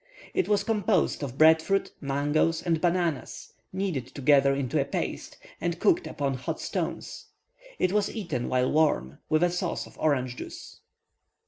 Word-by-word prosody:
It 380 - +1
was 205 -1 +3
composed 210 -6 +1
of 135 -3 -5
bread 160 +1 +7
fruit, 195 +4 0
mangoes, 145 +4 +1
and 165 -3 0
bananas, 175 -5 -1 0.2
kneaded 185 -10 -2
together 140 0 +3
into 140 +2 0
a - - -1
paste, 140 - -4 0.2
and 170 0 -2
cooked 355 -1 +3
upon 140 -2 -2
hot 130 0 -4
stones. - - -4 0.5
It 185 - +1
was 210 -1 +2
eaten, 165 - -3
while 130 0 +1
warm, 145 - +1
with 155 +2 +3
a 175 - +3
sauce 175 0 -2
of - - -17
orange 130 -5 0
juice. - - -9
155 Hz, 155 wpm, -27 LUFS, 140-180 Hz, 0.5 s, bread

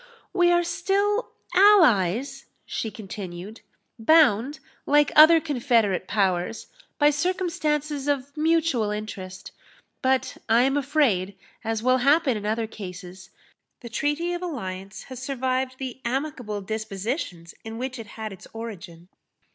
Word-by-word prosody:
"We 355 -2 +4
are 345 0 +3
still 405 +5 0 0.2
allies," 275 - +4 0.2
she 225 - -3
continued, 195 -1 -8 0.4
"bound, 280 0 +4 0.3
like 295 +1 +4
other 315 +2 +9
confederate 235 - +1
powers, 190 0 0 0.3
by 295 0 +5
circumstances 300 -4 -1
of 280 -1 -1
mutual 315 -8 +1
interest; 200 -3 -6 0.5
but 260 -1 0
I 230 +2 +5
am 270 +1 +2
afraid, 260 -10 +1 0.3
as 225 0 -2
will 255 +1 +4
happen 280 +1 +3
in 210 -1 -4
other 225 +1 0
cases, 185 -3 -9 0.5
the 240 - -8
treaty 295 +8 -1
of 350 - -4
alliance 195 - -6
has 255 -2 -9
survived 260 -1 -1
the 260 -1 -6
amicable 245 -5 -3
dispositions 200 - -4
in 225 0 -7
which 255 0 -4
it 225 - -8
had 215 -2 -5
its 190 - -13
origin. 185 -7 -8
250 Hz, 125 wpm, -25 LUFS, 210-295 Hz, 0.5 s, other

